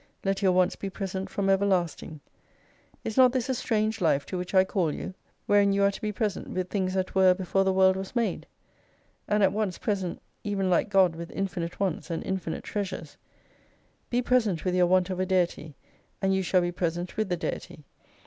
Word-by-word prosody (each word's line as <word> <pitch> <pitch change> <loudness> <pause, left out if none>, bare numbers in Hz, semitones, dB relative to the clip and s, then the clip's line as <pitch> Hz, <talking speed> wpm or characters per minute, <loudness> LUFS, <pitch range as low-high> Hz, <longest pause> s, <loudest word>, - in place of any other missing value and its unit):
Let 195 +1 0
your 190 -2 +4
wants 180 0 +2
be 195 - -5
present 190 -1 -4
from 195 +1 -2
everlasting. 185 -5 0 0.8
Is 220 - -4
not 255 -1 +6
this 255 -1 -1
a - - +2
strange 220 -3 -1
life 145 -4 +2
to - - -6
which 180 +1 -4
I 185 - +7
call 185 -4 0
you? 185 - -6 0.3
Wherein 205 -1 +4
you 200 0 +2
are 200 - +4
to 195 - -9
be 215 - -1
present 210 -2 -2
with 185 0 -3
things 190 -2 -1
that 185 -1 -1
were 190 -1 +5
before 190 +1 0
the 190 - +2
world 190 0 +4
was 190 +4 -6
made? 235 -2 -1 0.8
And 210 0 +2
at 195 - +4
once 205 -4 -1
present 190 -5 -2 0.2
even 195 -3 -1
like 180 - +2
God 190 -4 +4
with 170 0 -7
infinite 180 -3 -4
wants 190 -4 -2
and 165 - -3
infinite 185 -4 -3
Treasures 185 -7 -5 0.9
•. - - -43
Be 245 +1 +1
present 220 -10 +1
with 180 - +1
your 180 -1 +4
want 185 +1 +2
of 185 - -3
a 185 - +1
Deity, 175 -5 0 0.4
and 195 0 +1
you 190 - +1
shall 185 0 +2
be 175 0 -1
present 175 0 -3
with 215 -2 -1
the 180 - 0
Deity. 155 -3 -5
190 Hz, 205 wpm, -27 LUFS, 180-200 Hz, 0.9 s, I